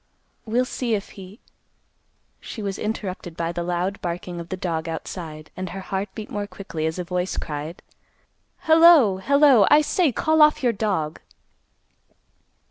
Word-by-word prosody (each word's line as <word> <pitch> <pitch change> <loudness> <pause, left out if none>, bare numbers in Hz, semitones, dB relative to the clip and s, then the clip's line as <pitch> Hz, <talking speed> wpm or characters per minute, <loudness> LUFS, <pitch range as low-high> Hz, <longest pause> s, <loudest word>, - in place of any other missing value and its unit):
We'll 240 +3 +1
see 245 -3 -1
if 200 - -5
he—" 195 +3 -12 1.0
She 220 - -8
was 195 -1 -3
interrupted 190 -5 -5
by 165 0 -1
the 175 - -4
loud 180 +3 -2
barking 175 0 -4
of 170 0 -8
the 185 - -4
dog 165 -3 -3
outside, 160 -1 -7
and 185 -1 -5
her 195 - -6
heart 195 +1 -3
beat 215 -2 -7
more 205 -1 -3
quickly 180 -5 -5
as 160 - -3
a 180 - -2
voice 180 +1 -3
cried, 155 +2 -5 0.8
"Hello, 320 - +6
hello, 275 -1 +5
I 295 +1 +7
say; 315 0 +1
call 315 +6 +2
off 300 -1 +5
your 240 -2 +3
dog!" 195 -8 -2
190 Hz, 155 wpm, -23 LUFS, 175-230 Hz, 1.0 s, I